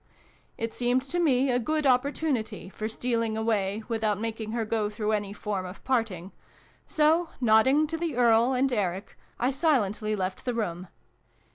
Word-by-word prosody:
It 225 Hz, 0 st, -3 dB
seemed 245 Hz, +1 st, +1 dB
to 340 Hz, +6 st, -3 dB
me 270 Hz, -5 st, +3 dB
a 245 Hz, -, +2 dB
good 310 Hz, +4 st, -1 dB
opportunity 260 Hz, -4 st, 0 dB
for 215 Hz, +2 st, -5 dB
stealing 230 Hz, -1 st, -1 dB
away 215 Hz, -2 st, 0 dB
without 220 Hz, -3 st, 0 dB
making 225 Hz, -1 st, -4 dB
her 230 Hz, -2 st, -1 dB
go 215 Hz, -1 st, -1 dB
through 210 Hz, 0 st, -2 dB
any 205 Hz, -2 st, -1 dB
form 205 Hz, -2 st, -3 dB
of 185 Hz, +1 st, -9 dB
parting: 215 Hz, -8 st, -1 dB, 0.6 s
so, 320 Hz, +2 st, +2 dB
nodding 255 Hz, +6 st, +4 dB
to 325 Hz, +2 st, -4 dB
the 330 Hz, -5 st, -2 dB
Earl 235 Hz, +1 st, +4 dB
and 260 Hz, +1 st, +1 dB
Eric, 195 Hz, -3 st, -2 dB, 0.2 s
I 250 Hz, +2 st, +2 dB
silently 220 Hz, -, +1 dB
left 185 Hz, -1 st, -3 dB
the 245 Hz, -2 st, -2 dB
room. 185 Hz, -5 st, -3 dB
230 Hz, 160 wpm, -27 LUFS, 210-260 Hz, 0.6 s, nodding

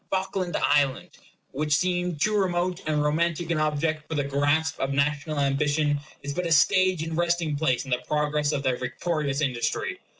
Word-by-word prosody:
Falkland 190 Hz, -1 st, -1 dB
Island, 145 Hz, -2 st, +1 dB, 0.4 s
which 150 Hz, +1 st, 0 dB
seemed 180 Hz, -1 st, 0 dB
too 215 Hz, +6 st, +1 dB
remote 180 Hz, -2 st, 0 dB
and 150 Hz, -1 st, +1 dB
romantic 170 Hz, +2 st, 0 dB
an 160 Hz, -, +1 dB
object 155 Hz, 0 st, -1 dB
for 160 Hz, -, -4 dB
the 145 Hz, -, +1 dB
grasp 145 Hz, +3 st, 0 dB
of 135 Hz, -, -1 dB
national 145 Hz, +2 st, 0 dB
ambition, 145 Hz, +1 st, +1 dB, 0.2 s
is 140 Hz, 0 st, -4 dB
but 180 Hz, +3 st, -2 dB
a -, -, -3 dB
stage 185 Hz, +1 st, +4 dB
and 165 Hz, 0 st, -4 dB
resting 170 Hz, -2 st, 0 dB
place 140 Hz, -4 st, 0 dB
in 135 Hz, -, -8 dB
the 125 Hz, 0 st, +1 dB
progress 150 Hz, 0 st, 0 dB
of 140 Hz, -2 st, -2 dB
their 130 Hz, -2 st, +1 dB
victorious 140 Hz, +2 st, -2 dB
industry. 140 Hz, -, -1 dB
155 Hz, 175 wpm, -26 LUFS, 145-170 Hz, 0.4 s, stage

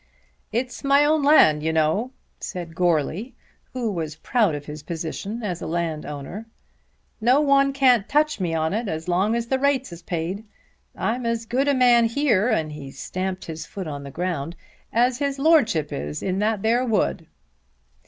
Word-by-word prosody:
"It's 245 Hz, +3 st, -3 dB
my 280 Hz, +1 st, +4 dB
own 310 Hz, +1 st, +3 dB
land, 275 Hz, -, +5 dB
you 160 Hz, +1 st, 0 dB
know," 160 Hz, +9 st, +1 dB, 0.3 s
said 175 Hz, -4 st, -6 dB
Goarly 175 Hz, -, 0 dB, 0.4 s
who 240 Hz, -4 st, -2 dB
was 160 Hz, -5 st, -4 dB
proud 205 Hz, 0 st, +1 dB
of 145 Hz, 0 st, -7 dB
his 150 Hz, 0 st, -8 dB
position 170 Hz, +8 st, -5 dB
as 180 Hz, -4 st, -3 dB
a -, -, -4 dB
landowner. 160 Hz, +3 st, -4 dB, 0.7 s
"No 250 Hz, +5 st, +4 dB
one 275 Hz, -1 st, +4 dB
can't 255 Hz, -6 st, +3 dB
touch 300 Hz, -2 st, +2 dB
me 170 Hz, -3 st, -1 dB
on 160 Hz, +2 st, 0 dB
it, 225 Hz, +2 st, -2 dB
as 160 Hz, -1 st, -4 dB
long 190 Hz, +6 st, +2 dB
as 235 Hz, -1 st, -1 dB
the 265 Hz, +2 st, 0 dB
rates 275 Hz, -4 st, +1 dB
is 170 Hz, -, -10 dB
paid. 175 Hz, +4 st, -3 dB, 0.5 s
I'm 245 Hz, +3 st, -1 dB
as 230 Hz, 0 st, -1 dB
good 260 Hz, +5 st, 0 dB
a 285 Hz, -, +3 dB
man 245 Hz, -2 st, +5 dB
here," 230 Hz, -4 st, +2 dB
and 160 Hz, -9 st, 0 dB
he 145 Hz, -2 st, -8 dB
stamped 185 Hz, +7 st, -4 dB
his 160 Hz, -1 st, -7 dB
foot 195 Hz, -2 st, -6 dB
on 145 Hz, -2 st, -5 dB
the 140 Hz, -, -8 dB
ground, 170 Hz, 0 st, -3 dB, 0.4 s
"as 245 Hz, +2 st, +2 dB
his 280 Hz, -1 st, -1 dB
Lordship 245 Hz, -, +3 dB
is 75 Hz, +2 st, -4 dB
in 190 Hz, 0 st, -1 dB
that 210 Hz, -1 st, 0 dB
there 235 Hz, +3 st, +2 dB
wood." 205 Hz, -8 st, 0 dB
200 Hz, 175 wpm, -23 LUFS, 160-250 Hz, 0.7 s, land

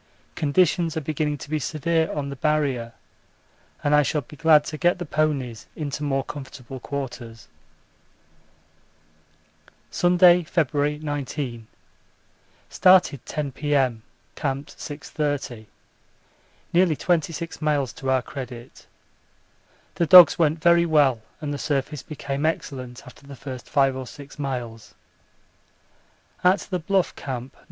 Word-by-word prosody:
Conditions 165 Hz, +2 st, +1 dB
are -, -, -1 dB
beginning 150 Hz, 0 st, -2 dB
to 140 Hz, -, -10 dB
be 155 Hz, -, 0 dB
severe 160 Hz, +3 st, 0 dB
on 140 Hz, -2 st, -3 dB
the 140 Hz, -, -6 dB
Barrier 140 Hz, -6 st, 0 dB, 0.9 s
and 145 Hz, -, +2 dB
I 150 Hz, -, +6 dB
shall 150 Hz, +1 st, 0 dB
be 145 Hz, -, -14 dB
glad 155 Hz, 0 st, +5 dB
to 155 Hz, -, -6 dB
get 175 Hz, +1 st, +3 dB
the 175 Hz, -, -5 dB
ponies 145 Hz, -7 st, -1 dB
into 145 Hz, -2 st, -4 dB
more 135 Hz, -2 st, 0 dB
comfortable 135 Hz, -2 st, -9 dB
quarters. 120 Hz, -4 st, -6 dB, 2.4 s
Sunday, 180 Hz, 0 st, +5 dB
February 150 Hz, -3 st, 0 dB
19. 145 Hz, -6 st, -4 dB, 1.0 s
Started 180 Hz, -8 st, +4 dB
10 150 Hz, -2 st, -3 dB
P.M. 135 Hz, -5 st, 0 dB, 0.3 s
Camped 140 Hz, 0 st, -4 dB
6.30. 145 Hz, -6 st, -4 dB, 1.1 s
Nearly 175 Hz, -2 st, +4 dB
26 165 Hz, 0 st, -2 dB
miles 145 Hz, -5 st, 0 dB
to 135 Hz, -4 st, -5 dB
our 130 Hz, -1 st, +2 dB
credit. 125 Hz, -4 st, -9 dB, 1.1 s
The 170 Hz, -, 0 dB
dogs 180 Hz, 0 st, +9 dB
went 160 Hz, -1 st, +2 dB
very 170 Hz, 0 st, +5 dB
well 140 Hz, -7 st, +3 dB, 0.2 s
and 150 Hz, -2 st, -4 dB
the 145 Hz, -, -4 dB
surface 145 Hz, -1 st, -2 dB
became 140 Hz, -2 st, -5 dB
excellent 130 Hz, -6 st, -3 dB
after 135 Hz, +2 st, -15 dB
the 140 Hz, -, -9 dB
first 130 Hz, -2 st, -8 dB
5 135 Hz, -2 st, +3 dB
or 130 Hz, -1 st, -6 dB
6 140 Hz, +2 st, -12 dB
miles. 120 Hz, -5 st, -5 dB, 1.5 s
At 185 Hz, +1 st, +4 dB
the 185 Hz, -2 st, -3 dB
Bluff 190 Hz, +3 st, 0 dB
Camp, 130 Hz, -1 st, -6 dB
No. -, -, -26 dB
145 Hz, 125 wpm, -24 LUFS, 135-160 Hz, 2.4 s, dogs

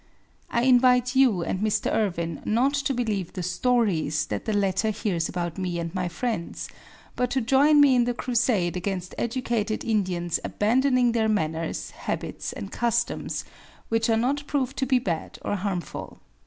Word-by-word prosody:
I 235 Hz, -, +1 dB
invite 250 Hz, 0 st, +4 dB
you 245 Hz, -10 st, +4 dB
and 185 Hz, -, -2 dB
Mr. 215 Hz, 0 st, 0 dB
Irwin 170 Hz, -6 st, -1 dB
not 245 Hz, +6 st, +2 dB
to 275 Hz, -1 st, 0 dB
believe 210 Hz, -7 st, -2 dB
the 180 Hz, -, -4 dB
"stories" 180 Hz, -6 st, +1 dB
that 105 Hz, -1 st, -4 dB
the 220 Hz, -, -1 dB
latter 200 Hz, +1 st, +1 dB
hears 195 Hz, -6 st, -1 dB
about 175 Hz, -1 st, -3 dB
me 180 Hz, -2 st, -2 dB
and 170 Hz, 0 st, -4 dB
my 185 Hz, -2 st, -1 dB
friends, 190 Hz, +1 st, -3 dB, 0.5 s
but 250 Hz, -, 0 dB
to 270 Hz, -, +1 dB
join 270 Hz, +5 st, +4 dB
me 285 Hz, -2 st, +7 dB
in 245 Hz, -1 st, +4 dB
the 245 Hz, 0 st, -1 dB
crusade 225 Hz, -8 st, +1 dB
against 185 Hz, 0 st, -3 dB
educated 235 Hz, -3 st, -1 dB
Indians 180 Hz, -6 st, 0 dB
abandoning 250 Hz, +3 st, +2 dB
their 225 Hz, -1 st, +1 dB
manners, 165 Hz, -6 st, -2 dB
habits -, -, -4 dB
and 100 Hz, -, -7 dB
customs 235 Hz, 0 st, -1 dB, 0.4 s
which 225 Hz, 0 st, +1 dB
are 225 Hz, -, +3 dB
not 280 Hz, +5 st, 0 dB
proved 270 Hz, -3 st, -1 dB
to 265 Hz, -, 0 dB
be 260 Hz, 0 st, +4 dB
bad 175 Hz, -10 st, -3 dB
or -, -, -1 dB
harmful. 190 Hz, -3 st, -4 dB
220 Hz, 165 wpm, -25 LUFS, 180-250 Hz, 0.5 s, me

